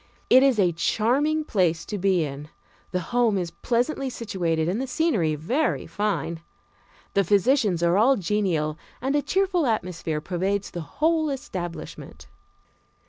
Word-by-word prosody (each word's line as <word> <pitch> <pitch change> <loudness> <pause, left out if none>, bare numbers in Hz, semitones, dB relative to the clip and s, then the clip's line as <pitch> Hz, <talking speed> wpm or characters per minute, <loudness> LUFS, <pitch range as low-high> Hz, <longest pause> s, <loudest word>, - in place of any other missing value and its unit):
It 255 - +8
is 270 -3 +4
a 185 -4 +3
charming 265 - +1
place 180 - 0
to 210 - -4
be 185 -3 +2
in 145 +1 -6 0.4
the 180 - -2
home 235 -4 +3
is 175 -2 -3
pleasantly 245 - -1
situated 175 -9 -2
and 195 +8 -1
the 265 - -3
scenery 245 - +1
very 245 - -1
fine. 205 -5 -2 0.7
The 200 - +3
physicians 205 - +2
are 170 +3 +3
all 260 +5 +4
genial, 170 -6 -1 0.2
and 270 +3 -1
a 295 - +3
cheerful 370 -3 +1
atmosphere 180 -8 -2
pervades 190 +4 -2
the 175 - -5
whole 315 - 0
establishment. 190 - -6
200 Hz, 140 wpm, -25 LUFS, 170-260 Hz, 0.7 s, It